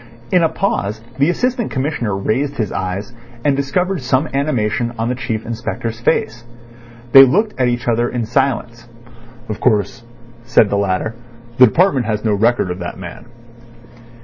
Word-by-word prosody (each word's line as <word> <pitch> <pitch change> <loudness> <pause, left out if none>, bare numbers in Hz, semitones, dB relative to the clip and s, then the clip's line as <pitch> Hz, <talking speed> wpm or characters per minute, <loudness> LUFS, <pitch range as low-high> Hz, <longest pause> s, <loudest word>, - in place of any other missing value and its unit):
In 180 - +4
a 165 - +3
pause 110 - -2 0.2
the 140 +4 +4
Assistant 245 +5 0
Commissioner 130 -7 -2
raised 135 +8 -1
his 110 -4 -2
eyes, 95 +5 -4 0.3
and 145 -2 +3
discovered 180 +6 -1
some 130 +3 +1
animation 120 -4 0
on 115 +1 -1
the - - 0
Chief 115 -3 -4
Inspector's 115 0 -4
face. 120 0 0 0.7
They 135 +1 +11
looked 210 - +2
at 125 - +3
each 120 0 -2
other 120 +1 +1
in 120 -2 -2
silence. 120 -1 -1 0.6
"Of 110 - -5
course," 110 -1 0 0.4
said 120 -4 +3
the - - +1
latter, 100 +2 -1 0.5
"the 125 - +9
department 140 - +2
has 110 0 -2
no 110 - +2
record 115 -2 +1
of 90 - -5
that 90 -1 -6
man." 90 +3 -9
120 Hz, 160 wpm, -18 LUFS, 110-135 Hz, 0.7 s, They